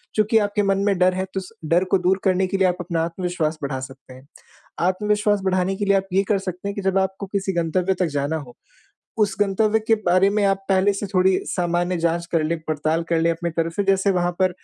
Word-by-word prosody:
चूँकि 215 +1 +3
आपके 205 0 +1
मन 195 -1 +2
में 200 -2 +2
डर 185 0 +4
है 185 +1 -2
तो 195 - -1
उस 185 +2 -10
डर 170 +4 +3
को - - +5
दूर 185 +1 +1
करने 190 -1 +2
के 195 - -2
लिए 190 -1 +3
आप 180 0 -1
अपना 170 -2 -2
आत्मविश्वास 170 -2 -2
बढ़ा 135 -1 -2
सकते 130 0 -11
हैं। 130 +2 -16 0.5
आत्मविश्वास 210 +3 +1
बढ़ाने 185 0 +1
के 205 - -2
लिए 200 0 +3
आप 195 0 -1
ये 195 - +3
कर 205 - +2
सकते 185 0 -5
हैं 200 - -4
कि 200 - -3
जब 190 0 +1
आपको 190 +1 -2
किसी 195 0 -2
गंतव्य 175 +2 0
तक 180 - +3
जाना 145 +2 -1
हो। 135 -6 -9 0.6
उस 205 -3 +2
गंतव्य 210 +2 +2
के 225 - +6
बारे 185 +3 +4
में 205 0 +1
आप 195 0 0
पहले 195 +1 +3
से 200 +1 -4
थोड़ी 190 -1 +2
सामान्य 175 0 -1
जाँच 170 +1 0
कर 165 -2 +2
लें 165 +2 -1
पड़ताल 155 +2 0
कर 165 -1 +2
लें 165 +1 +2
अपनी 170 +1 -2
तरफ़ 165 0 -2
से 205 - 0
जैसे 195 0 +2
वहाँ 175 -2 0
पर 185 - +3
185 Hz, 240 wpm, -22 LUFS, 170-195 Hz, 0.6 s, के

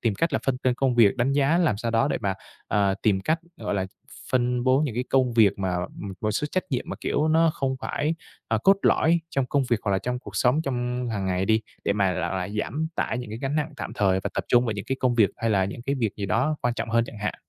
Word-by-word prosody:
Tìm 115 -4 +1
cách 165 +8 0
là - - +2
phân 135 -2 +2
cân 125 -1 +1
công 130 -1 +1
việc, 115 -4 +5
đánh 125 +3 +1
giá 145 +4 +3
làm 160 - +2
sao 115 +2 -2
đó 115 +5 +2
để 140 - -1
mà, 95 -1 -1 0.3
à, 100 -1 +2
tìm 100 -3 +2
cách, 160 +10 +1 0.2
gọi - - -3
là, 95 -1 -1 0.4
phân 125 -1 +1
bố 130 +1 +4
những 145 -7 -1
cái 125 +2 -1
công 130 -2 +3
việc 105 -4 +4
mà, 95 -2 -1 0.3
ừm, 100 -1 -5
một 110 - 0
số 130 +7 -1
trách 185 - -1
nhiệm 125 -3 -1
mà, - - -4
kiểu, 155 - 0
nó 165 +1 +4
không 130 -1 -1
phải, 150 +3 -1 0.3
à, 110 - +1
cốt 195 +1 +6
lõi 165 +2 +3
trong 135 -4 0
công 140 +2 +1
việc 120 - +3
hoặc 100 - -1
là 95 - +2
trong 125 +4 -3
cuộc - - -9
sống 135 +6 +3
trong 125 -2 -2
hàng 100 -3 -2
ngày 90 0 0
đi, 110 +2 +3 0.2
để - - +2
mà 100 -2 +1
là, - - -2
à, 95 -1 -2
giảm 125 +9 -2
tải 125 - -1
những 125 -4 -6
cái 110 - -5
gánh 135 +3 -2
nặng 150 +1 -1
tạm - - -5
thời 95 -2 +2
và - - -3
tập - - -1
trung 120 0 +4
vào 115 - -1
những 100 -1 -5
cái 135 - -2
công 125 -2 +2
việc 110 -4 +4
hay 115 - -1
là 95 -3 +3
những 100 +5 -6
cái 135 +3 -1
việc 115 -6 -2
gì 100 - -3
đó 155 +9 +1
quan 120 -1 +1
trọng 115 - -4
hơn 115 0 +3
chẳng 110 - -10
hạn. 105 -1 -2
120 Hz, 285 wpm, -25 LUFS, 105-135 Hz, 0.4 s, cốt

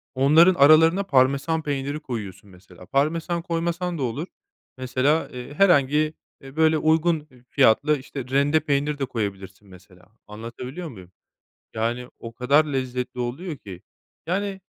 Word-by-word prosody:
onların 155 +7 +5
aralarına 160 +5 +5
Parmesan 140 +2 +2
peyniri 145 +1 -3
koyuyorsun 105 - -7
mesela. 90 -1 -16
Parmesan 165 - -1
koymasan 170 +1 -2
da 135 - -3
olur. 135 +9 -3 0.5
Mesela, 130 +5 0
eee, 125 +3 -9
herhangi, 155 -3 +3 0.3
eee, 135 +1 -13
böyle 160 0 +3
uygun 160 +1 +2
eb 125 -1 -21
fiyatlı, 140 +4 +3
işte, 135 0 -8
rende 140 +3 +2
peynir 145 -1 -1
de 135 - 0
koyabilirsin 100 -3 -6
mesela, 90 -1 -18 0.2
anlatabiliyor 125 +10 -8
muyum? 95 -7 -13 0.6
Yani, 120 +3 -2
o 115 0 -9
kadar 140 +5 +3
lezzetli 130 -2 -4
oluyor 140 +6 -4
ki. 95 -5 -11 0.5
Yani, 195 +1 -2
140 Hz, 135 wpm, -23 LUFS, 120-160 Hz, 0.6 s, onların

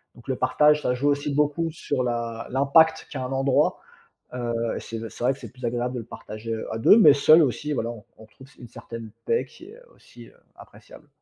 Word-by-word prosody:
Donc 120 - -18
le 130 - 0
partage, 150 0 +3
ça 125 - +1
joue 145 +3 0
aussi 145 0 -1
beaucoup 150 +3 0
sur 145 -5 -3
la 120 -1 -3
l'impact 140 +5 +3
qu'a 130 -3 -4
un 130 - -5
endroit, 135 0 +1 0.5
heu 120 -1 -3 0.2
et - - -4
c'est 115 -1 -7
d 115 - -6
c'est - - -9
vrai 130 +2 +3
que 135 - -15
c'est - - -10
plus 125 -1 -9
agréable 120 +2 -2
de - - -3
le 115 - -8
partager, 115 0 -7
heu, 110 - -5
à - - -3
2, 205 - +6
mais 155 -10 +8
seul 155 +3 +6
aussi, 140 +3 -2
voilà, 115 -2 -2 0.3
on 110 - -14
trouve 130 +5 -17
une 120 - -11
certaine 115 -2 -9 0.2
paix 125 +3 0
qui 335 - -16
est, - - -13
heu, - - -18
aussi, - - -16
heu, - - -20 0.2
appréciable. - - -16
130 Hz, 235 wpm, -24 LUFS, 115-145 Hz, 0.5 s, mais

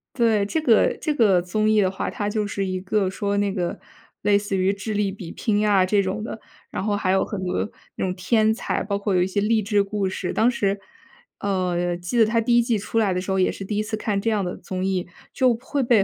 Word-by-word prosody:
对， 225 -5 +3
这 265 +10 -1
个 235 -7 +4
这 305 - 0
个 200 -8 +4
综 215 +4 0
艺 215 -1 +4
的 190 - +3
话， 190 - -3
它 205 0 -3
就 215 0 -1
是 200 -1 -2
一 185 -1 -3
个 195 0 0
说 200 +1 -2
那 200 -1 +1
个 180 -3 -2 0.4
类 205 -1 +4
似 200 -1 -2
于 190 +2 +2
智 205 +2 -5
力 205 -1 +1
比 185 -4 -8
拼 210 -2 0
啊， 195 -3 +4
这 200 +1 +2
种 190 +3 -3
的。 225 - -6 0.3
然 - - -4
后 205 0 0
还 185 -2 0
有 190 - +3
很 200 -3 -5
多 180 +3 -1 0.3
那 - - -3
种 185 -1 0
天 215 +4 +2
才， 225 - -2
包 200 0 -2
括 200 -2 0
有 180 - +3
一 - - 0
些 190 +2 -1
励 215 +2 +2
志 205 0 +2
故 200 -1 -1
事。 185 -1 -3
当 230 +3 +3
时 200 -4 0 0.6
呃， 180 -3 0
记 175 +7 -3
得 225 - +6
它 230 +1 +1
第 235 +1 +3
1 240 - +6
季 235 -1 +1
出 210 +3 -1
来 200 -4 +2
的 180 - -1
时 190 +1 -4
候， 190 - +1
也 185 - +3
是 - - -7
第 205 +2 -3
1 210 - +1
次 215 +1 -3
看 210 -2 -1
这 225 +3 0
样 210 -3 +1
的 180 - -4
综 185 -1 -5
艺。 185 -2 -1 0.3
就 255 -2 +3
会 270 +4 -3
被 235 -5 +4
205 Hz, 275 characters per minute, -23 LUFS, 190-215 Hz, 0.6 s, 得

